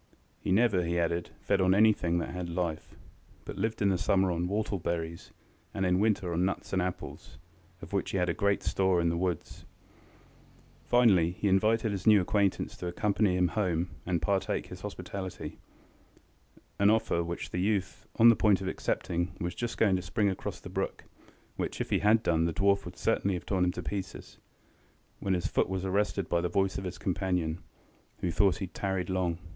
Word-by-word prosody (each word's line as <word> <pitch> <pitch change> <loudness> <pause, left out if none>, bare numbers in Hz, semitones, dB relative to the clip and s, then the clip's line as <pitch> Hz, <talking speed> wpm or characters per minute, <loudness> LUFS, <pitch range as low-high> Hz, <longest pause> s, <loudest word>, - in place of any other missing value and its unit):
He - - -3
never, 100 -2 +3
he 85 +1 -1
added, 85 0 0
fed 100 -1 +1
on 95 0 +4
anything 100 -5 +3
that 85 - -2
had 90 -1 -5
life, 85 -2 -3 0.5
but - - -7
lived 110 +1 -1
in 100 - +4
the 95 -2 +1
summer 95 -1 +2
on 85 +1 -1
whortle 100 0 -1
berries, 85 0 -4 0.4
and 95 - 0
in 90 0 +2
winter 100 -4 +1
on 85 +2 +1
nuts 95 +1 -2
and 95 - +2
apples, 90 -4 -6 0.5
of - - -10
which 100 - 0
he - - -1
had 90 -1 +1
great 100 -1 +1
store 95 -2 +2
in 85 0 +2
the 85 - 0
woods. 90 0 -3 1.2
Finally, 105 -9 +4
he 100 - -2
invited 110 +3 +2
his 100 +1 -4
new 105 -2 +8
acquaintance 100 +1 0
to 90 - -5
accompany 100 +1 +1
him 90 -1 +3
home 90 -5 -1
and 85 -4 -1
partake 100 +1 0
his - - -10
hospitality, 95 -2 -6 1.2
an 100 +1 +5
offer 110 -6 +2
which 85 +1 -5
the 90 - -2
youth 100 -1 -1
was - - -4
on 115 - +10
the 115 - +6
point 105 -3 +3
of 95 - -4
accepting, 85 -2 -1
and - - -18
was 90 +1 -2
just 120 +3 -4
going 100 -4 +3
to 90 - -1
spring 100 +3 0
across 95 - -4
the - - -10
brook - - -3 0.5
(which - - -3
if - - -3
he - - +3
had 110 +2 +4
done, 80 -1 +2
the 85 - -1
dwarf 100 +1 +2
would 90 0 -9
certainly 100 -4 +1
have 90 - -6
torn 95 -2 +1
him 90 - +1
to - - -6
pieces) 95 -2 -6 0.8
when 95 -1 0
his 90 0 -2
foot - - +1
was 95 0 -2
arrested 100 -1 0
by 85 +1 +1
the 90 - -1
voice 95 +1 0
of 95 - -7
his 90 -1 -5
companion, 90 -3 -1 0.6
who 90 - 0
thought 95 +3 +3
he 100 - -3
had 90 - -14
tarried 95 -2 -2
long. 90 -3 0
95 Hz, 200 wpm, -30 LUFS, 85-100 Hz, 1.2 s, on